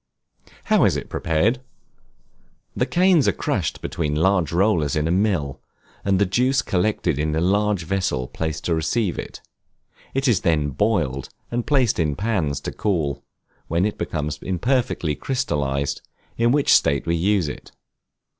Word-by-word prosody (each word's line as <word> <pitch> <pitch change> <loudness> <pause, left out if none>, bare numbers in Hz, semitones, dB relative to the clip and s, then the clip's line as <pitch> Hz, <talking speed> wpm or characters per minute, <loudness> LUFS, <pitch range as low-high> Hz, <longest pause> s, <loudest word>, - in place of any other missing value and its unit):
How - - +3
is - - +2
it - - -7
prepared? 100 +11 +1 1.1
The - - 0
canes 180 -4 +4
are - - +5
crushed - - -2
between 75 -3 -2
large 90 -1 +2
rollers 85 -6 +2
in 75 +1 0
a - - 0
mill, 90 - 0 0.4
and 100 -1 +2
the 100 - +3
juice 125 +6 +1
collected 90 -5 0
into 75 +1 0
a - - +1
large 100 +1 +1
vessel 80 -8 -1
placed 80 +2 -4
to 85 - +1
receive 85 +5 0
it; - - -8 0.7
it 135 +1 +1
is 110 -7 +3
then 75 -4 +1
boiled, 70 - 0 0.2
and 120 0 -2
placed 130 -9 +2
in 75 -3 +1
pans 85 -10 -1
to - - -4
cool, 80 -9 -1 0.4
when 85 +4 +1
it 105 - -3
becomes 75 -1 -3
imperfectly 95 - 0
crystallized, 70 - -2 0.3
in 115 +1 +2
which 145 +1 +4
state 70 -1 +3
we 85 - +1
use 95 0 +1
it. 75 - -8
90 Hz, 155 wpm, -22 LUFS, 75-110 Hz, 1.1 s, are